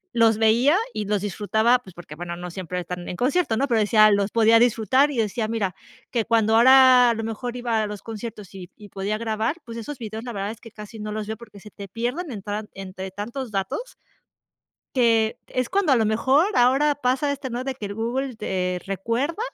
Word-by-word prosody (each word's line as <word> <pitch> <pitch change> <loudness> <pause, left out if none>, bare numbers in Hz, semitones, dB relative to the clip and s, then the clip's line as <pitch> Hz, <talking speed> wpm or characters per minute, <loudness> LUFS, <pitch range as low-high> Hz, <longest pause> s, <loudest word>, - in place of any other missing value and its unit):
los 225 -2 +4
veía 235 +8 +4 0.2
y 210 - -3
los 205 -1 0
disfrutaba, 220 +4 +2
pues, 190 -7 -16
porque, 170 -3 -10
bueno, 170 +2 -6
no 175 0 -7
siempre 180 0 -5
están 180 0 -6
en - - -4
concierto, 255 - +1
¿no? 275 - +1
Pero 235 -4 +2
decía, 215 0 +5
los 200 0 +1
podía 225 +1 +5
disfrutar 245 +4 +3
y 285 - -5
decía, 220 0 -1
mira, 215 -4 -2 0.4
que 235 -3 0
cuando 225 -1 +2
ahora 255 0 +7
a - - +2
lo 225 - -4
mejor 235 +2 -5
iba 235 -3 -1
a 210 - -1
los 205 -1 -8
conciertos 220 -3 -8
y 185 -2 -9
y 205 -1 -13
podía 200 +2 -3
grabar, 225 +5 -1
pues 230 - -8
esos 285 +5 -7
videos 220 -2 -6
la 245 - -6
verdad 200 -1 -3
es 225 - -12
que 230 - -11
casi 215 0 -11
no 210 0 -5
los 215 0 -4
veo, 220 +1 -4
porque 215 -4 -14
se 210 +2 -13
te 200 -1 -9
pierden 245 - -3
entran 210 0 -5
entre 190 0 -7
tantos 235 +6 -6
datos 205 - -4 1.0
que 225 -3 +2
es 255 -1 -2
cuando 385 -6 +2
a - - +5
lo 225 - +2
mejor 260 - +3
ahora 270 +4 +3
pasa 270 +1 0
este, 280 -1 -4
¿no? 245 +1 -4
De 265 0 -3
que 210 -5 -6
Google 245 +5 -3
te 180 -4 -2
recuerda, 230 - -2
225 Hz, 215 wpm, -23 LUFS, 205-250 Hz, 1.0 s, ahora